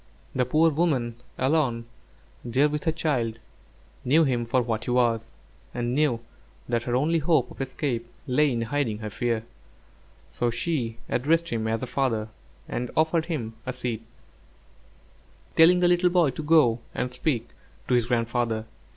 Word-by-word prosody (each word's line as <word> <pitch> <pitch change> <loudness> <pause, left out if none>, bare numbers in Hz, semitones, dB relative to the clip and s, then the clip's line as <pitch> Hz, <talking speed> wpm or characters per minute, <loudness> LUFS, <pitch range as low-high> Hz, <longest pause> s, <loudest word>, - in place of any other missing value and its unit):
The 125 -1 +1
poor 160 +5 +4
woman, 140 -8 0 0.2
alone 130 -5 +1 0.6
there 130 +5 +3
with 150 +1 -3
her 160 - +3
child, 130 -9 -1 0.7
knew 155 +6 +4
him 120 -5 0
for 125 +1 +2
what 110 -1 -2
he - - -4
was, 115 -2 +2 0.5
and 120 0 -1
knew 135 -5 +2 0.5
that 120 -1 0
her 120 - 0
only 160 +6 +2
hope 150 -5 +2
of - - -8
escape 130 -3 -2 0.2
lay 145 +3 +3
in 115 -2 -1
hiding 115 -3 -1
her 110 -1 -6
fear, 115 -2 -1 0.9
so 120 - 0
she 120 -2 -2
addressed 165 +6 +1
him 110 -1 -1
as 110 0 -1
her - - -2
father, 120 -5 -1 0.4
and 125 0 -3
offered 160 +1 +2
him 125 -10 -3
a 130 - -4
seat, 120 -3 -3 1.5
telling 175 +2 +6
the 175 - +5
little 175 0 +4
boy 175 -5 +3
to 130 - -6
go 150 -7 +4 0.2
and 125 +1 -2
speak 125 -3 -1 0.4
to - - +1
his 120 -2 +3
grandfather. 115 -2 0
125 Hz, 160 wpm, -26 LUFS, 115-155 Hz, 1.5 s, telling